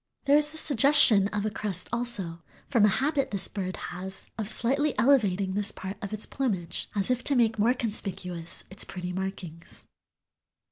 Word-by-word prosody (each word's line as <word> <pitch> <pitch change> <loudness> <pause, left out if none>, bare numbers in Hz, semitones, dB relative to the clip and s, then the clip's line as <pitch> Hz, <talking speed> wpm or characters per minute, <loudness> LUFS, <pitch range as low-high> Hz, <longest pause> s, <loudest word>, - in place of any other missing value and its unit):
There 280 +1 +4
is 300 0 +3
the 315 - -8
suggestion 275 -8 +5
of 210 0 -3
a 215 - -1
crest 195 -4 -1
also, 205 -9 -1 0.3
from 235 -7 +3
a 205 - +2
habit 280 0 0
this 195 -2 +2
bird 185 -2 -5
has 190 +2 -6
of 215 -3 -3
slightly 275 +7 0
elevating 200 -8 +2
this 205 +1 +2
part 190 +1 -7
of 200 - -6
its 215 0 +3
plumage, 190 -10 -3
as 200 +3 +1
if 250 0 -1
to 280 - +4
make 225 -3 +2
more 235 +5 +3
conspicuous 180 -7 -3
its 195 - +1
pretty 180 -1 -6
markings." 180 -3 -7
210 Hz, 175 wpm, -27 LUFS, 190-250 Hz, 0.3 s, suggestion